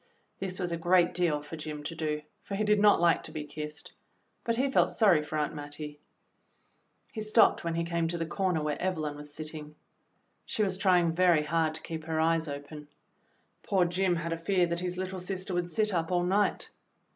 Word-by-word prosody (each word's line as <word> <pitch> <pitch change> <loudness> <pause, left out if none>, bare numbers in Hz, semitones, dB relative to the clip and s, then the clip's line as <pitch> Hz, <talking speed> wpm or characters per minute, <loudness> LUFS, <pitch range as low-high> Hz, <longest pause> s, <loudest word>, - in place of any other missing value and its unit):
This 185 -1 -4
was 175 -2 -2
a 170 - -1
great 175 +1 +3
deal 165 -4 +1
for 150 +2 -7
Jim 150 -1 -6
to 150 - -5
do, 155 -2 -2 0.2
for 200 - -5
he 210 - 0
did 210 0 +3
not 205 0 +6
like 170 -1 +4
to - - -8
be 155 - -4
kissed. 150 0 -7 0.5
But 230 - 0
he 260 +4 +1
felt - - +4
sorry 195 -9 +4
for 150 +1 -4
Aunt 150 0 -1
Mattie. 150 0 -7 1.1
He 220 - -4
stopped 215 +1 +4
when 170 -1 -2
he 170 - 0
came 170 -1 -1
to 170 +1 -2
the 165 - -2
corner 180 -1 0
THE - - -3
PLAID 150 -1 -1
DRESS - - -16
37 185 - 0
where - - -10
Evelyn 145 -1 -3
was 150 0 -9
sitting. 155 0 -7 0.7
She 215 - 0
was 190 -2 -1
trying 180 -4 +3
very 170 -2 +4
hard 160 0 0
to 160 - -8
keep 160 -1 -6
her 160 -1 -1
eyes 165 0 +2
open. 145 +1 -7 0.7
Poor 190 -3 +2
Jim 180 +1 +1
had 165 0 -2
a - - -3
fear 180 +2 +2
that 170 0 -2
his 180 0 -3
little 185 0 -4
sister 185 +1 -4
would 175 0 -1
sit 215 +2 0
up 165 0 -1
all 175 -1 +2
night. 195 +3 +1
170 Hz, 225 wpm, -29 LUFS, 155-185 Hz, 1.1 s, not